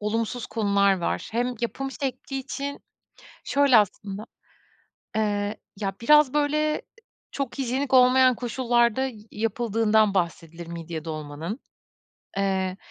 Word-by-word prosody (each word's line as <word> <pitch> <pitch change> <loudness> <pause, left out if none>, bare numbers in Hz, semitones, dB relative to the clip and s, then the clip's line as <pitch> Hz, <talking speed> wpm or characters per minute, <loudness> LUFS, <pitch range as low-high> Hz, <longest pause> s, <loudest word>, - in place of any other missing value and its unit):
olumsuz 225 +3 -2
konular 200 -3 +2
var. 170 - -2
Hem 245 +2 0
yapım 270 +3 -3
şekli 270 0 -4
için 280 +1 -5 0.6
Şöyle, 280 -3 +4
aslında, 205 0 -1 0.9
eee, 205 -1 0 0.2
ya, 195 -2 -2
biraz, 300 +2 +5
böyle, 300 +1 +1 0.5
çok 275 -2 -4
hijyenik 265 +2 -1
olmayan 255 0 +6
koşullarda 240 +1 +1 0.2
yapıldığından 220 -1 +2
bahsedilir 170 -2 -3
midye 165 -1 -6
dolmanın. 155 - -5 0.8
Eee, 190 -1 0
225 Hz, 100 wpm, -25 LUFS, 195-260 Hz, 0.9 s, olmayan